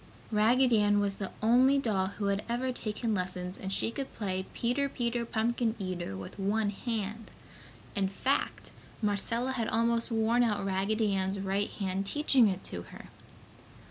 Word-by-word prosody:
Raggedy 230 +2 +4
Ann 205 0 +4
was 200 -1 0
the 195 - -4
only 255 +5 +5
doll 210 -8 +1
who 205 +1 -4
had 200 +1 0
ever 250 +2 0
taken 220 -1 -2
lessons, 180 -1 -2
and 190 - -4
she 225 - 0
could 275 +2 -5
play 190 -3 -3
Peter 260 +4 0
Peter 235 -2 -2
Pumpkin 230 0 0
Eater 180 - -4
with 95 - -9
one 205 +2 +1
hand. 220 0 -4 0.6
In 195 -1 +1
fact, 260 +8 -1 0.3
Marcella 230 +5 +1
had 235 -4 -1
almost 230 +1 +2
worn 225 +1 +2
out 210 -4 +1
Raggedy 200 +2 +1
Ann's 190 0 0
right 195 +1 0
hand 195 -1 -2
teaching 270 -3 +4
it 190 -1 -2
to 85 - -5
her. - - -12
215 Hz, 160 wpm, -30 LUFS, 195-235 Hz, 0.6 s, only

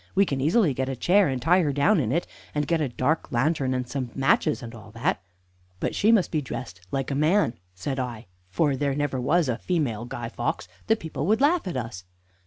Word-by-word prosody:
We 200 +1 +5
can 140 -6 -2
easily 165 - +3
get 130 +1 -2
a 135 - -2
chair 185 - +4
and 130 -2 -1
tie 175 +7 +4
her 150 -4 +1
down 145 +8 +3
in 120 -6 0
it, 170 +5 +1 0.3
and 150 0 +1
get 165 +1 +1
a 145 - 0
dark 135 +6 -1
lantern 130 +1 +1
and 125 -1 -2
some 130 -1 -3
matches 135 +1 +2
and 115 0 -8
all 110 -2 -11
that." 115 -6 -1 0.6
"But - - -1
she 215 +2 +3
must 215 -6 +3
be 155 - 0
dressed 90 -9 -7
like 135 +4 -2
a - - 0
man," 155 - +3 0.2
said 130 +9 -3
I; 120 -3 -4 0.3
"there 140 -2 +1
never 145 -3 -1
was 155 +5 +2
a 120 -1 -1
female 135 - -1
Guy 120 -1 -5
Fawkes. 120 0 -3 0.2
The 220 - +4
people 160 -6 -4
would 220 +2 +3
laugh 300 - +3
at 175 - -3
us." 110 -7 -5
140 Hz, 220 wpm, -25 LUFS, 125-165 Hz, 0.6 s, We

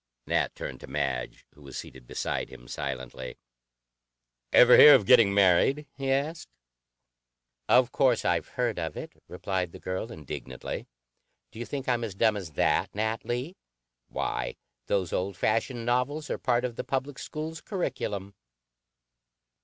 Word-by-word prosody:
Nat - - 0
turned - - -6
to - - -11
Madge, 65 -3 -3
who 75 - -20
was 70 -2 -9
seated 65 -2 -9
beside - - -3
him - - -13
silently. 65 -1 -5 1.1
"Ever 125 0 +8
hear 150 - +11
of 115 -7 +2
'getting 100 +1 +6
married?'" 100 +9 +4
he 135 -1 -3
asked. 150 +4 -1 1.2
"Of 125 0 +5
course 130 -5 +2
I've 85 -1 +1
heard 120 -6 0
of 80 -1 -4
it," - - -7
replied 90 -1 -3
the - - -10
girl 95 +5 -4
indignantly. 65 -4 -6 0.6
"Do 110 - -11
you 120 - -5
think 135 -2 -5
I'm 120 -2 +1
as 105 -5 -4
dumb 110 +1 +3
as 90 -7 -6
that, - - +1
Nat 110 +1 -1
Lee? 125 +10 -3 0.5
Why, - - -3 0.3
those 95 -4 0
old 95 0 -2
fashioned 115 +4 0
novels 125 +5 0
are - - -2
part 120 0 +1
of 120 -2 -5
the - - -2
public 135 +1 -3
schools' 160 +1 -6
curriculum." 105 - -3
110 Hz, 150 wpm, -28 LUFS, 85-130 Hz, 1.2 s, hear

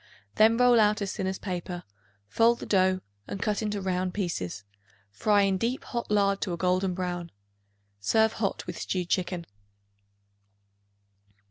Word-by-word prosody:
Then 220 +1 +5
roll 245 -1 +5
out 210 0 +4
as 195 - -3
thin 190 - -2
as 190 0 -2
paper; 180 -2 -5 0.4
fold 230 - +3
the - - -7
dough 185 -1 +2 0.3
and 200 - -5
cut 210 0 0
into 210 -1 -2
round 185 -1 -1
pieces; 100 - -3 0.5
fry 205 - +3
in 195 -1 +1
deep 240 +5 -1
hot 235 -1 -4
lard 200 -1 +2
to 180 - -1
a - - -3
golden 185 +1 +1
brown. 175 -2 -3 0.7
Serve 220 - +3
hot 200 -3 -2
with - - -6
stewed 180 -2 -2
chicken. 180 -2 -1
190 Hz, 150 wpm, -28 LUFS, 180-210 Hz, 0.7 s, Then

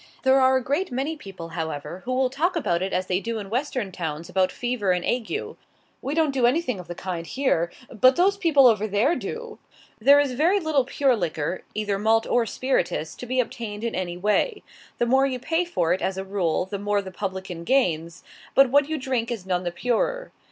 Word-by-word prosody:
There 265 0 +5
are 260 0 +5
a 260 - -2
great 290 +9 -1
many 275 +6 -2
people, 190 - -9
however, 165 +1 -5
who 255 - -3
will 255 0 +1
talk 340 +7 0
about 175 - 0
it 190 - -2
as 185 0 0
they 185 0 0
do 230 +2 -3
in 200 -2 -7
Western 250 -5 -2
towns 165 -2 -5
about 185 0 +1
fever 240 -6 0
and 180 -1 -2
ague: 250 - -2 0.5
"We 280 +3 -3
don't 320 -3 +2
do 255 -3 +3
anything 250 - 0
of 180 - -9
the 175 - -6
kind 175 -2 -4
here, 175 -11 0 0.2
but 255 +3 +5
those 375 +3 +4
other 400 - -16
people 295 -6 +5
over 215 -3 +4
there 220 - +2
do!" 470 -1 -6 0.4
There 280 +6 +7
is 285 -2 +1
very 330 +10 +2
little 310 -6 +1
pure 265 0 +2
liquor, 175 -3 -2
either 205 -2 -1
malt 225 +2 +3
or 240 -2 +1
spirituous, 180 -12 -1
to 245 - -9
be 255 +2 0
obtained 225 -4 -3
in 235 - -2
any 175 -2 -3
way. 210 - 0 0.3
The 240 - +1
more 265 +3 +3
you 260 -2 -2
pay 325 +7 0
for 175 - +1
it, 185 - -2
as 190 0 -1
a 190 - -3
rule, 185 -4 0
the 200 +1 -5
more 205 0 0
the 190 - -8
publican 190 -3 -5
gains, 170 -8 0 0.3
but 270 -2 +6
what 285 +1 +4
you 315 - -1
drink 255 -4 -2
is 225 -6 -4
none 180 -1 0
the 175 -1 -3
purer. 250 - -1
235 Hz, 220 wpm, -24 LUFS, 185-270 Hz, 0.5 s, There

